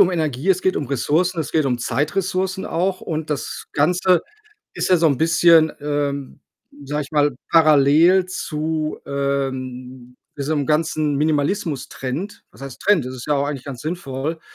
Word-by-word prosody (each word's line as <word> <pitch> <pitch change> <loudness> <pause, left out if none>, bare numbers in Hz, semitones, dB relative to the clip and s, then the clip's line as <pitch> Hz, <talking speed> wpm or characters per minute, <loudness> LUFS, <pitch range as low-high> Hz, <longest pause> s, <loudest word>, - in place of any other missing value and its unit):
um 185 -2 +6
Energie, 155 -1 -2
es 185 -1 +3
geht 185 - +1
um 145 - -2
Ressourcen, 155 +8 0
es - - -5
geht 155 -2 +2
um 125 -2 0
Zeitressourcen 185 - -1
auch. 185 +2 -1
Und 155 -1 -4
das 140 -5 -4
Ganze 180 +3 +2 0.5
ist - - -1
ja 180 - +6
so 165 - +3
'n 140 -4 +2
bisschen, 165 -1 +5
ähm, 145 -2 -3 0.4
sage 150 +2 -2
ich 145 +2 -12
mal, 145 -1 +3 0.2
parallel 160 +4 +5
zu, 155 -3 -3
ähm, 130 -2 -4 0.2
diesem 145 0 -1
ganzen 155 -1 +1
Minimalismus-Trend. 150 +1 -2
Was - - -16
heißt 135 -2 -9
Trend? 190 -10 +3
Das 130 - -6
ist 125 +1 -8
ja 150 - +3
auch 140 0 +1
eigentlich 140 -3 -5
ganz 135 -4 -7
sinnvoll, 155 -1 -4
150 Hz, 160 wpm, -21 LUFS, 140-170 Hz, 0.5 s, um